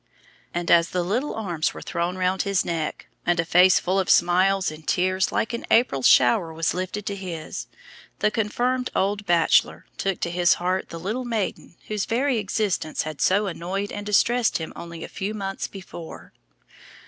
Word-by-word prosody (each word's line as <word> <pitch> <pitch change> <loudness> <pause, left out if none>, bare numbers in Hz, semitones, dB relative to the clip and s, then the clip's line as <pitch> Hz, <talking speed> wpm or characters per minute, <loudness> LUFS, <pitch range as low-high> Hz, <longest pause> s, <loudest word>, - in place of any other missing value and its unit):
And 175 0 -2
as 170 0 +5
the 180 -1 -1
little 235 +11 -1
arms 175 -8 -2
were - - -8
thrown 175 +1 -2
round 185 +1 +1
his 200 -2 0
neck, 165 -3 -3 0.2
and 175 0 +1
a 165 - +1
face 180 +3 +6
full 190 +2 0
of 190 - -1
smiles 185 +1 +3
and 155 0 -12
tears 185 +1 +1
like 230 - -1
an 235 - -4
April 225 - +3
shower 130 +6 +4
was 160 0 -1
lifted 185 +3 -4
to 200 - -3
his, 175 -5 -6 0.5
the 210 - +1
"confirmed 245 +4 0
old 205 +1 0
bachelor" 170 -1 +3
took 195 -2 -1
to 170 - -1
his 175 0 +3
heart 185 +2 -2
the 165 - -7
little 215 +9 -3
maiden 220 -7 -3
whose 210 -2 -2
very 250 +1 +1
existence 200 -5 -1
had 155 -2 -6
so 200 +3 +3
annoyed 190 +2 -3
and 205 0 -6
distressed 235 +3 +3
him 160 - -6
only 170 -1 -8
a - - -6
few 205 +3 -4
months 195 -2 -4
before. 180 -4 -10
185 Hz, 180 wpm, -24 LUFS, 170-205 Hz, 0.5 s, face